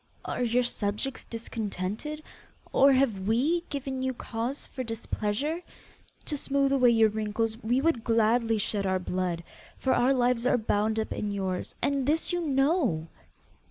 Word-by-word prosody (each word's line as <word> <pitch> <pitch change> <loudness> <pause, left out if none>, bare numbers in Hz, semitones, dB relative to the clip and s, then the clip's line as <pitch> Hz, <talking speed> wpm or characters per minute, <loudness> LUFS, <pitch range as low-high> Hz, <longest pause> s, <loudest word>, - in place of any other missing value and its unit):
Are - - -3
your 245 +1 +2
subjects 215 +3 -2
discontented? 225 +5 -4 0.5
or 275 +1 +6
have 235 -8 +2
we 290 +10 +2
given 270 -2 -3
you 260 -1 -1
cause 235 +4 -4
for 260 - -5
displeasure? 225 +6 -2 0.6
To 300 - -2
smooth 275 -1 +1
away 255 -3 +5
your 225 -2 +5
wrinkles, 220 +1 -1
we 245 +4 +1
would 285 -7 +1
gladly 230 0 +3
shed 200 -1 -1
our 190 0 +2
blood, 180 -2 -2 0.3
for 265 - +1
our 245 +2 +3
lives 250 -2 +2
are 255 - +4
bound 215 -1 0
up 220 - -1
in 210 - -3
yours; 190 -2 -3
and 275 -2 +1
this 320 +4 +2
you 350 - 0
know. 270 - +1
235 Hz, 155 wpm, -28 LUFS, 215-270 Hz, 0.6 s, or